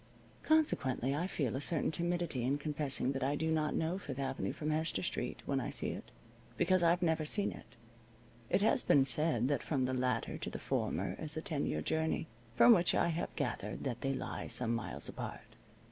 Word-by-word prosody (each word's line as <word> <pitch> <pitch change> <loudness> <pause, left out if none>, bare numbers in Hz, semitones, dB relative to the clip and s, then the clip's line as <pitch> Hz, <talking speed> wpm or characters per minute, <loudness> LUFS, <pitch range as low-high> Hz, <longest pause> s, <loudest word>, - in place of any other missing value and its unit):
Consequently 140 - +2
I 165 +5 -1
feel 140 - -1
a 135 - -2
certain 155 +1 +1
timidity 170 -5 -1
in 135 +4 +1
confessing 145 -3 0
that 135 -1 -2
I 140 +2 +1
do 160 +2 0
not 155 -1 +1
know 165 +4 0
Fifth 135 -8 -6
Avenue 135 -8 -2
from 155 0 -3
Hester 155 - 0
Street - - -3
when - - 0
I - - -3
see - - -1
it, - - -6 0.5
because 185 +1 +3
I've 175 +1 +3
never 160 -2 +2
seen 200 +7 +1
it. - - -12 0.7
It 190 +3 +2
has 245 +4 +4
been 135 -2 +4
said 135 -3 +2
that 140 -2 +1
from 135 -4 0
the 130 - -1
latter 125 -2 -1
to - - -4
the - - -5
former - - -1
is 155 0 -5
a - - -1
ten 155 -8 -1
year 75 0 -1
journey, 160 - 0 0.3
from 240 - +8
which 175 -5 +3
I - - +3
have 165 0 -3
gathered 120 -7 -3
that 120 -3 -3
they 135 0 0
lie - - -4
some 115 -2 -1
miles 115 - -3
apart. - - -7
150 Hz, 205 wpm, -34 LUFS, 130-170 Hz, 0.7 s, from